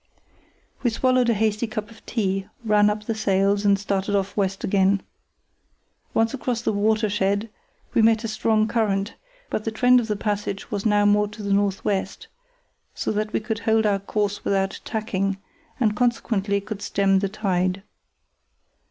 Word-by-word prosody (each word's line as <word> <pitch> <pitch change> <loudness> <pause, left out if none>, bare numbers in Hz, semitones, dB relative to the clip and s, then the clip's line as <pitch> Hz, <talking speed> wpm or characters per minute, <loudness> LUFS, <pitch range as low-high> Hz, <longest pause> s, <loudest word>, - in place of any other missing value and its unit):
We 245 - +2
swallowed 255 +1 +2
a 230 - +3
hasty 215 +2 0
cup 215 +1 -5
of 225 - -16
tea, 195 -4 -1 0.2
ran 210 -1 +4
up 210 0 -3
the 225 - -1
sails, 200 -1 +1
and 200 -1 +4
started 200 0 -1
off 195 -1 -1
west 195 -1 -1
again. 195 0 +2 1.1
Once 225 0 +2
across 245 -3 -2
the - - 0
"watershed" 205 0 +1 0.4
we - - +4
met 225 0 +4
a - - -2
strong 215 0 +1
current, 205 -3 0 0.4
but 215 - -1
the 225 - -1
trend 250 +3 +4
of 230 - -3
the 210 - -1
passage 205 0 -3
was 205 0 -1
now 205 -1 +3
more 210 0 +4
to 210 +1 -10
the 200 -1 0
north 200 -1 0
west, 195 -2 -2 0.7
so - - -2
that 215 0 -2
we - - 0
could 220 0 -3
hold 220 -1 +2
our 200 -1 +2
course 205 +1 -2
without 195 -1 0
tacking, 195 -3 -2 0.4
and 215 -4 +2
consequently 215 -4 0
could 200 +1 -7
stem 195 -1 +2
the 200 0 -1
tide. 185 -2 -1
210 Hz, 170 wpm, -23 LUFS, 195-220 Hz, 1.1 s, ran